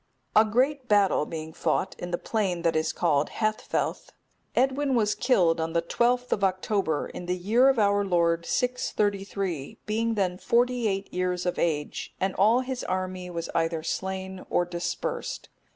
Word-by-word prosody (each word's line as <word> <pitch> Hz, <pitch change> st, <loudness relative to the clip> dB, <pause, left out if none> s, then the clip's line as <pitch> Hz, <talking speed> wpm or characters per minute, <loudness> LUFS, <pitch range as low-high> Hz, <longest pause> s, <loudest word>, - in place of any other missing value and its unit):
A 215 Hz, -, +8 dB
great 255 Hz, +5 st, +1 dB
battle 200 Hz, -7 st, +3 dB
being 160 Hz, -1 st, -6 dB
fought 190 Hz, -, -1 dB
in 175 Hz, -, -5 dB
the 175 Hz, -, -1 dB
plain 190 Hz, -6 st, -1 dB
that 165 Hz, -1 st, +2 dB
is 160 Hz, 0 st, +1 dB
called 150 Hz, -4 st, +1 dB
Haethfelth,(271) 215 Hz, -1 st, -2 dB, 0.5 s
Edwin 270 Hz, +1 st, +2 dB
was 210 Hz, -3 st, +2 dB
killed 175 Hz, -10 st, +2 dB
on 160 Hz, 0 st, -2 dB
the 170 Hz, -, +2 dB
12th 245 Hz, +7 st, +1 dB
of 200 Hz, -, 0 dB
October, 190 Hz, -4 st, 0 dB
in 175 Hz, -, -8 dB
the 180 Hz, -, 0 dB
year 225 Hz, +9 st, +4 dB
of 265 Hz, -, +2 dB
our 205 Hz, -1 st, +3 dB
Lord 170 Hz, -3 st, +2 dB
633, 200 Hz, -, -1 dB
being 225 Hz, +2 st, 0 dB
then 185 Hz, -3 st, 0 dB
forty 245 Hz, 0 st, +2 dB
eight 195 Hz, -1 st, -3 dB
years 180 Hz, 0 st, -1 dB
of 180 Hz, -, -1 dB
age, 150 Hz, -3 st, -2 dB
and 190 Hz, 0 st, 0 dB
all 220 Hz, +6 st, +4 dB
his 260 Hz, -1 st, -4 dB
army 185 Hz, -1 st, -3 dB
was 170 Hz, -1 st, -4 dB
either 165 Hz, -1 st, 0 dB
slain 190 Hz, +1 st, -4 dB
or 175 Hz, -, +2 dB
dispersed. 175 Hz, 0 st, -4 dB
190 Hz, 165 wpm, -27 LUFS, 175-225 Hz, 0.5 s, A